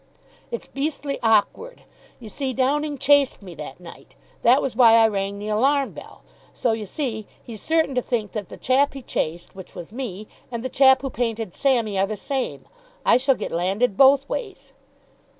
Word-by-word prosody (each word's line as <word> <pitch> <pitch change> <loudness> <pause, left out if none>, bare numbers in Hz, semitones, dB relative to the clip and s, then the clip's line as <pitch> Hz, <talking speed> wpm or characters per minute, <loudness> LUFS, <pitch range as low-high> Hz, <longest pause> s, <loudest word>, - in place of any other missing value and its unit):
"It's 475 - -5
beastly 280 0 -3
awkward. 225 - +1 0.4
You 235 - -10
see, 265 +4 -3
Downing 290 +3 0
chased 280 -4 +3
me 180 -3 -9
that 150 -2 -9
night. 175 -2 -14 0.3
That 250 +4 +5
was 265 -5 -3
why 230 -2 +7
I 225 -1 +6
rang 200 -1 -2
the 210 +1 -6
alarm 270 +6 +2
bell. - - -13 0.3
So, 240 - 0
you 220 -2 -3
see, 220 -5 -4 0.2
he's 225 -3 -9
certain 320 -3 +1
to 250 - +1
think 225 -5 -2
that 210 -4 -5
the - - -10
chap 275 +2 +2
he 270 - -8
chased, 170 -4 -3
which 190 -1 -11
was 170 - -9
me, 215 -5 -6 0.2
and 235 -1 -4
the - - -1
chap 265 0 +5
who 270 - -3
painted 225 -6 -3
Sammy, 235 -8 +1
are 195 - +2
the 215 0 -4
same. 270 +4 -4 0.4
I - - +6
shall 265 +1 +2
get - - -5
landed 195 +6 0
both 275 +3 +5
ways." 415 -6 -6
245 Hz, 185 wpm, -23 LUFS, 210-275 Hz, 0.4 s, why